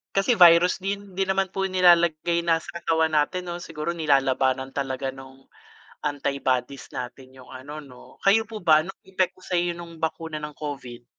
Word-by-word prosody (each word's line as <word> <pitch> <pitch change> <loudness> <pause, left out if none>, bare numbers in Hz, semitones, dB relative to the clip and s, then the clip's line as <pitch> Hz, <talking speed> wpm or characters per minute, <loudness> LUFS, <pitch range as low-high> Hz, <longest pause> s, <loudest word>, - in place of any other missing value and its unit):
Kasi 195 +5 +3
virus 175 -2 +6
din, 200 0 -4
hindi 190 - -3
naman 190 0 0
po 195 0 -1
nilalagay 170 -2 +3
na 170 -1 +2
sa 170 +1 -9
katawan 160 -1 +1
natin, 165 +5 +1
'no? 175 0 -5
Siguro 165 0 -4
nilalabanan 135 -4 +1
talaga 135 -1 -3
nung 135 0 -14 0.6
antibodies 140 -2 -2
natin 130 +1 -8
yung 130 - -14
ano, 140 +4 -8
'no? 135 -5 -14
Kayo 205 +3 +6
po 220 0 -8
ba 155 -5 +4
nung 190 +4 -9
epekto 185 -1 -1
sa'yo 175 -1 -1
nung 170 -1 -11
bakuna 160 -1 -3
ng 150 0 -6
Covid? 130 -5 -7
160 Hz, 165 wpm, -25 LUFS, 135-180 Hz, 0.6 s, virus